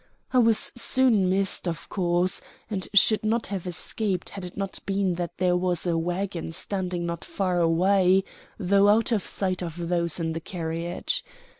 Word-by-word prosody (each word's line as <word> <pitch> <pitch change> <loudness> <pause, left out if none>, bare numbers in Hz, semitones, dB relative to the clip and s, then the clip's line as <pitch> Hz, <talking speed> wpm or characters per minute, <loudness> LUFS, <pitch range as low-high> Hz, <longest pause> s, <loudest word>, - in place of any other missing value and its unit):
I 255 - +5
was 225 -2 +3
soon 240 -6 +3
missed, 190 -1 0
of 165 -1 -4
course, 180 0 +1 0.3
and 190 -3 -2
should 215 +2 +5
not 225 +2 0
have 190 -2 -4
escaped 185 +2 -2
had 195 - -8
it 180 +1 -8
not 195 -1 -3
been 195 -2 +1
that 175 -1 -5
there 180 0 +2
was 180 -1 0
a 170 -2 +1
wagon 175 0 -2
standing 180 -2 -3
not 170 -1 -4
far 185 -3 -1
away, 185 +3 +4 0.3
though 200 +1 +4
out 225 +3 +3
of 220 -3 +2
sight 185 -2 -1
of 170 0 -5
those 170 -1 0
in 165 -1 -1
the 165 - -3
carriage. 170 - -3
185 Hz, 170 wpm, -26 LUFS, 175-200 Hz, 0.3 s, I